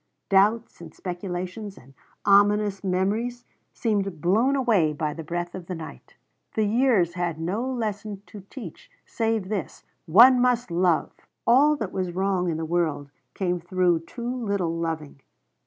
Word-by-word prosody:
Doubts 205 +2 +2
and 160 -2 -11
speculations 185 +2 -5
and 135 +2 -17 0.3
ominous 205 0 +4
memories 210 +6 -1 0.3
seemed 200 -7 -1
blown 220 - +2
away 215 - +2
by 150 0 -2
the 165 - -7
breath 175 +2 -4
of 180 -2 -8
the 185 - -4
night. 155 - -10 0.4
The 220 - +2
years 215 -5 +2
had 175 -3 -2
no 185 +8 -2
lesson 210 -4 -4
to 210 - -11
teach 220 - -10 0.2
save 225 -4 -1
this 200 -7 -4 0.2
One 240 +10 +8
must 245 -4 +1
love! 175 -1 +2 0.3
All 280 +6 +5
that 220 -9 -4
was 185 -2 -2
wrong 185 -1 0
in 160 - -2
the 160 - -3
world 155 -4 -1 0.2
came 180 -2 -1
through 175 -1 +1
too 240 +4 -5
little 195 -6 -1
loving. 160 -4 -4
190 Hz, 150 wpm, -25 LUFS, 170-220 Hz, 0.4 s, One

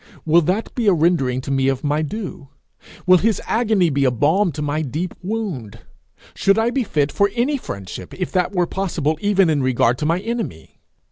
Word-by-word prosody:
Will 165 +2 +5
that 185 +7 -1
be 235 -4 -1
a 200 - +6
rendering 150 -7 +1
to 135 - -5
me 135 -1 +1
of 135 -1 0
my 150 +1 +1
due? 155 -4 -6 0.6
Will 185 -1 +6
his 220 +1 +1
agony 215 -7 +2
be 140 0 +1
a 130 - +4
balm 155 - +2
to 150 - -5
my 150 +1 -1
deep 155 +5 -3
wound? 180 - -4 0.6
Should 195 +1 +2
I 225 +2 +2
be 265 0 0
fit 150 -8 0
for 200 0 +2
any 265 +5 +1
friendship 95 - -8
if 180 - -4
that 180 -1 +1
were 180 -3 +1
possible 165 -5 -2
even 200 -2 +3
in 150 -3 +1
regard 125 -1 +2
to 150 - -1
my 165 +2 +1
enemy? 220 - -5
170 Hz, 200 wpm, -20 LUFS, 140-200 Hz, 0.6 s, a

